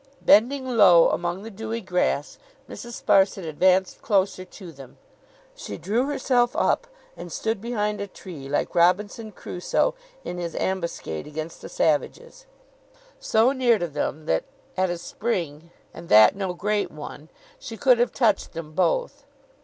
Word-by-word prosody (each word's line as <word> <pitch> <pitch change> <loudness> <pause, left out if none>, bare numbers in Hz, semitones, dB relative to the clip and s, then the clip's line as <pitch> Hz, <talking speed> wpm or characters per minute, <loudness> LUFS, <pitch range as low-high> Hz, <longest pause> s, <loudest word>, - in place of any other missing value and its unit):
Bending 260 +6 +4
low 200 -9 +6
among 175 +3 -3
the 225 - -8
dewy 225 +2 -5
grass, 180 -7 -1 0.3
Mrs. 240 -1 -9
Sparsit 195 -1 +3
advanced 185 +4 +2
closer 195 -3 +1
to 185 -1 -12
them. 135 -4 -14 0.6
She 100 - -7
drew 225 - -1
herself 255 -4 +1
up, - - +1 0.3
and 175 - -9
stood 220 +2 -2
behind 210 -3 -2
a 200 - -4
tree, 160 -8 -10
like 145 - -1
Robinson 205 +6 +1
Crusoe 180 - -1 0.3
in 180 - -5
his 170 -1 -5
ambuscade 170 - -3
against 155 +2 -7
the - - -9
savages; 485 - -1 0.7
so 225 +4 +3
near 250 -4 +3
to 175 - -2
them 155 0 -4
that 80 - 0 0.3
at 185 0 +1
a 175 - -2
spring, 170 -5 -4 0.2
and 170 - -11
that 110 - +7
no 190 -2 -3
great 205 0 -1
one, 150 0 -10 0.3
she 225 - -8
could 250 -2 +4
have 240 - +2
touched 220 -6 +1
them 165 -2 -7
both. - - -1
190 Hz, 150 wpm, -24 LUFS, 170-225 Hz, 0.7 s, that